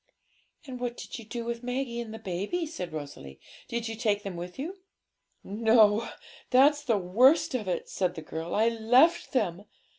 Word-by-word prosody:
'And 255 Hz, -3 st, -7 dB
what 245 Hz, -1 st, -3 dB
did -, -, -7 dB
you 230 Hz, -, -10 dB
do 235 Hz, +2 st, -5 dB
with 235 Hz, 0 st, -4 dB
Maggie 250 Hz, -1 st, -3 dB
and 220 Hz, -1 st, -8 dB
baby?' 200 Hz, -, -2 dB
said 185 Hz, -, -6 dB
Rosalie; 140 Hz, -, -8 dB, 0.3 s
'did 235 Hz, -1 st, -3 dB
you 225 Hz, -, -4 dB
take 210 Hz, -3 st, 0 dB
them 195 Hz, -3 st, -5 dB
with 175 Hz, +1 st, -7 dB
you?' 345 Hz, +8 st, -6 dB, 0.6 s
'No; 220 Hz, +1 st, +3 dB, 0.4 s
that's 290 Hz, +3 st, +5 dB
the 230 Hz, -6 st, +2 dB
worst 240 Hz, -, +4 dB
of 225 Hz, -6 st, -2 dB
it,' 180 Hz, -, -2 dB
said 180 Hz, -2 st, -1 dB
the 160 Hz, -, -7 dB
girl; 160 Hz, +2 st, -5 dB
'I 220 Hz, +2 st, +4 dB
left 245 Hz, +10 st, +3 dB
them. 200 Hz, -6 st, -1 dB
225 Hz, 175 wpm, -28 LUFS, 190-250 Hz, 0.6 s, that's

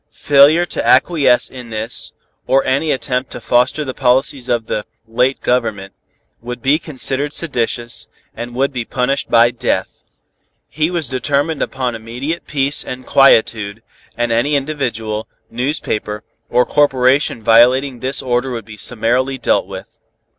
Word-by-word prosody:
Failure 145 Hz, +4 st, +5 dB
to -, -, -4 dB
acquiesce 140 Hz, -8 st, +3 dB
in 125 Hz, -2 st, -10 dB
this, 110 Hz, +2 st, -3 dB, 0.4 s
or 135 Hz, +1 st, +3 dB
any 140 Hz, +4 st, 0 dB
attempt 130 Hz, -1 st, -2 dB
to -, -, -6 dB
foster 125 Hz, +5 st, +1 dB
the 130 Hz, -, -4 dB
policies 130 Hz, 0 st, +1 dB
of 120 Hz, -2 st, 0 dB
the 105 Hz, -, -3 dB, 0.2 s
late 125 Hz, +4 st, 0 dB
government, 110 Hz, -6 st, -1 dB, 0.5 s
would 125 Hz, +1 st, -6 dB
be 135 Hz, +6 st, +2 dB
considered 140 Hz, -2 st, -2 dB
seditious, 120 Hz, -6 st, -2 dB, 0.3 s
and 120 Hz, 0 st, -7 dB
would 135 Hz, +2 st, 0 dB
be 125 Hz, -2 st, -2 dB
punished 130 Hz, +4 st, -1 dB
by 115 Hz, 0 st, +5 dB
death. 120 Hz, -, -3 dB, 0.6 s
He 155 Hz, +2 st, -1 dB
was 170 Hz, -5 st, -1 dB
determined 140 Hz, +4 st, -1 dB
upon 130 Hz, -2 st, -2 dB
immediate 120 Hz, +9 st, -5 dB
peace 140 Hz, -1 st, 0 dB
and 125 Hz, 0 st, -7 dB
quietude, 110 Hz, -5 st, +3 dB, 0.3 s
and 120 Hz, -1 st, 0 dB
any 120 Hz, +6 st, +1 dB
individual, 120 Hz, -7 st, -3 dB, 0.2 s
newspaper 115 Hz, -4 st, -3 dB, 0.3 s
or 125 Hz, -, +3 dB
corporation 135 Hz, -4 st, +2 dB
violating 125 Hz, +3 st, +4 dB
this 130 Hz, +2 st, -1 dB
order 125 Hz, +1 st, 0 dB
would 115 Hz, -4 st, -5 dB
be 110 Hz, -1 st, -11 dB
summarily 125 Hz, +4 st, 0 dB
dealt 100 Hz, -6 st, +1 dB
with. 95 Hz, -1 st, -10 dB
125 Hz, 140 wpm, -17 LUFS, 115-140 Hz, 0.6 s, Failure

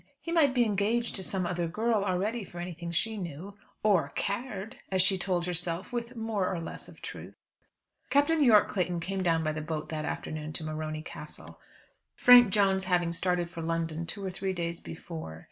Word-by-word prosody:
He 335 Hz, -, -6 dB
might 295 Hz, -6 st, +4 dB
be 245 Hz, -1 st, +4 dB
engaged 215 Hz, +3 st, +1 dB
to 190 Hz, -, -1 dB
some 185 Hz, -1 st, 0 dB
other 175 Hz, -1 st, -1 dB
girl 215 Hz, +4 st, +1 dB
already 205 Hz, +4 st, -1 dB
for 175 Hz, -, -12 dB
anything 170 Hz, -1 st, -5 dB
she 220 Hz, +6 st, 0 dB
knew; 180 Hz, +2 st, -6 dB, 0.3 s
"or 200 Hz, -6 st, +3 dB
cared," 215 Hz, +1 st, -3 dB
as 185 Hz, -1 st, +4 dB
she 190 Hz, +1 st, +5 dB
told 180 Hz, -1 st, 0 dB
herself 175 Hz, +3 st, -1 dB
with 240 Hz, +1 st, -3 dB
more 220 Hz, -4 st, -1 dB
or 180 Hz, -, -2 dB
less 165 Hz, -, -5 dB
of -, -, -15 dB
truth. -, -, -8 dB, 0.7 s
Captain 295 Hz, +2 st, +4 dB
Yorke 220 Hz, -5 st, +6 dB
Clayton 180 Hz, -3 st, -1 dB
came 190 Hz, +3 st, -3 dB
down 165 Hz, -3 st, +2 dB
by 155 Hz, -, +1 dB
the 155 Hz, 0 st, -4 dB
boat 155 Hz, -1 st, -4 dB
that 155 Hz, -1 st, -3 dB
afternoon 155 Hz, 0 st, -4 dB
to 160 Hz, -, -5 dB
Morony 155 Hz, 0 st, -4 dB
Castle, -, -, -9 dB, 0.6 s
Frank 245 Hz, -2 st, +8 dB
Jones 195 Hz, -1 st, +3 dB
having 175 Hz, -2 st, +2 dB
started 175 Hz, 0 st, 0 dB
for 170 Hz, -1 st, -7 dB
London 165 Hz, 0 st, -2 dB
two 200 Hz, +2 st, -4 dB
or 190 Hz, -, -2 dB
three 190 Hz, +1 st, -2 dB
days 170 Hz, -1 st, -3 dB
before. 160 Hz, -, -8 dB
185 Hz, 190 wpm, -29 LUFS, 170-210 Hz, 0.7 s, Frank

